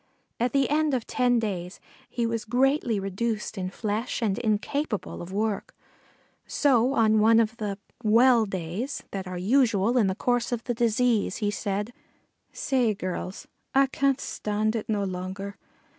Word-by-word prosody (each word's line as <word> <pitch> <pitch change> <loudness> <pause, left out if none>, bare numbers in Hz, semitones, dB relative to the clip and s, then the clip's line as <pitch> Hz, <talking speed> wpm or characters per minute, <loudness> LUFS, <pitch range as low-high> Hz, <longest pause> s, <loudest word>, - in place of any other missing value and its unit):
At 240 +1 +1
the 275 -1 +2
end 300 -1 +2
of 245 - -2
ten 245 -1 +2
days 190 -5 -3 0.3
he 235 -1 -1
was 230 -1 -1
greatly 245 -1 +1
reduced 210 +4 -2
in 185 -2 -3
flesh 215 +4 -2
and 220 -3 0
incapable 225 +2 -2
of 175 +1 -8
work, 210 +1 -2 0.7
so 260 -2 +3
on 220 -4 +4
one 225 +1 +6
of 230 +1 +1
the 205 -3 -3 0.3
"well 230 +1 +5
days" 190 - -4
that 190 -1 -4
are 185 0 -5
usual 230 +2 +3
in 210 - +3
the 190 - -1
course 245 +2 0
of 235 -1 -2
the 245 - -1
disease 230 -3 +1
he 210 -2 0
said: 205 +2 -3 0.6
"Say, 245 -6 +1
gurruls, 185 0 -5 0.3
I 275 0 +6
can't 275 0 +1
stand 215 -1 -1
it 225 - -4
no 205 -2 +1
longer. 190 +2 -5
220 Hz, 160 wpm, -26 LUFS, 200-245 Hz, 0.7 s, one